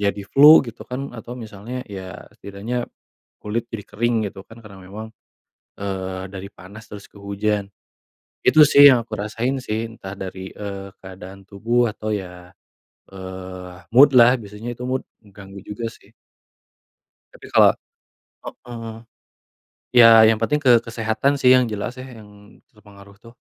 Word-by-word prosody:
jadi 100 0 -1
flu, 150 +2 +8
gitu 115 -2 -10
kan, 135 +2 -6
atau 120 +1 -9
misalnya, 115 +2 -8
ya, 95 -2 -8 0.2
setidaknya 110 +5 -5 0.5
kulit 110 +2 -3
jadi 105 -3 -7
kering 115 -1 -1
gitu 95 - -13
kan, 115 - -15
karena 100 -3 -14
memang, 105 +4 -9 0.7
eee, 95 -1 -5
dari 95 0 -8
panas 100 +3 -14
terus 100 -1 -10
ke - - -16
hujan. 100 0 -2 0.8
Itu 155 -1 +6
sih 145 0 +8
yang 120 -3 +1
aku 110 - -10
rasain 115 +5 -3
sih, 110 0 -3
entah 100 -4 -10
dari, 95 0 -7
eee, 100 -1 -7
keadaan 95 +1 -12
tubuh 115 +5 0
atau 110 0 -6
ya, 90 -3 -6 0.6
eee, 95 -1 -9 0.2
mood-lah, 125 -2 +7
biasanya 105 +3 -8
itu 120 - -10
mood, 130 0 -2 0.2
mengganggu 100 -2 -13
juga 105 +3 -7
sih. 100 - -22 1.2
Tapi - - -14
kalau - - +6 0.7
heeh. 115 -2 -9 1.0
Ya 115 -2 +9
yang 110 - +3
penting 150 +6 0
ke 120 -4 +4
kesehatan 115 +5 -1
sih 125 - +5
yang 125 - +3
jelas 105 +4 -5
ya 130 - -8 0.2
yang 105 -1 -18
terpengaruh 100 -2 -18
tuh. 115 0 -16
105 Hz, 145 wpm, -21 LUFS, 100-120 Hz, 1.2 s, Ya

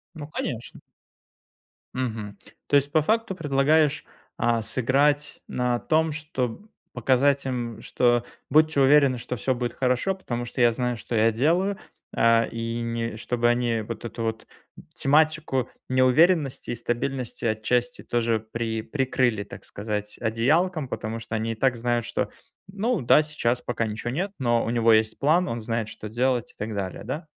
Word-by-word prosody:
Ну 150 -2 -7
конечно! 120 -6 -5 1.1
Мгм. 110 -5 -4 0.3
То 145 - +4
есть, 140 0 +2
по 155 - +4
факту, 220 +3 0
предлагаешь, 150 -1 +2 0.3
а, 115 -1 +1
сыграть 140 +5 +1
на 125 -1 0
том, 160 +2 +1
чтоб 150 - -4 0.3
показать 135 +3 +2
им, 120 -3 -3
что 120 -1 +2 0.3
"будьте 155 0 +4
уверены, 135 -2 +5
что 125 +1 -5
всё 130 +5 0
будет 120 -1 -3
хорошо, 125 +9 +1
потому 120 -10 -4
что 120 +1 -6
я 120 -1 +5
знаю, 125 0 -1
что 115 - -6
я 115 +1 +4
делаю". 175 - +1 0.4
А 115 0 +4
и 115 0 -3
не 115 -1 -3
чтобы 120 +1 0
они 120 -2 +1
вот 110 +1 -7
эту 115 0 -5
вот 110 0 -3 0.5
тематику 150 -3 +2 0.2
неуверенности 130 +3 +3
и - - -1
стабильности 120 +1 -3
отчасти 120 +3 0
тоже 115 -1 0
при 115 -1 -2
прикрыли, 125 -5 0
так - - -11
сказать, 105 0 -5
одеялком, 150 +8 +1
потому 110 0 -4
что 110 - -6
они 115 +1 -2
и - - -3
так 125 +2 +1
знают, 120 0 0
что 120 - -2 0.4
"ну 215 +5 -1
да, 130 +5 +5
сейчас 125 -5 -1
пока 115 -1 -2
ничего 110 +3 -4
нет, 185 +9 -2
но 120 -3 +2
у - - -3
него 115 -1 +4
есть 110 0 +2
план, 165 +6 +3
он 115 0 -3
знает, 115 -1 -2
что 105 0 -8
делать" 125 +1 0
и - - -31
так 110 +1 -4
далее, 95 -2 -4
да? 145 +8 -5
125 Hz, 160 wpm, -25 LUFS, 115-145 Hz, 1.1 s, уверены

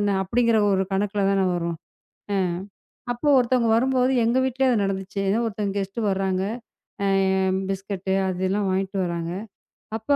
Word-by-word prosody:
என்ன? 205 -1 +1
அப்படிங்கிற 230 +2 +2
ஒரு 190 0 +2
கணக்குல 200 +1 0
தானா 195 -1 +2
வரும். 170 -1 -2 0.6
அ - - +1 0.8
அப்ப 240 +5 -11
ஒருத்தங்க 245 -1 +2
வரும்போது 255 +1 +2
எங்க 235 +3 +2
வீட்டிலேயே 260 0 +1
அது 220 -4 +2
நடந்துச்சு. 195 0 -3 0.2
ஒருத்தங்க 210 -2 -2
கெஸ்ட் 195 +4 -4
வர்றாங்க. 190 -1 0 1.3
பிஸ்கட்டு 195 0 -3 0.2
அது 185 0 -3
எல்லாம் 195 0 0
வாங்கிட்டு 190 +1 -1
வர்றாங்க. 170 -1 -3 0.7
அப்போ 255 +6 +1
195 Hz, 135 wpm, -24 LUFS, 190-235 Hz, 1.3 s, அப்படிங்கிற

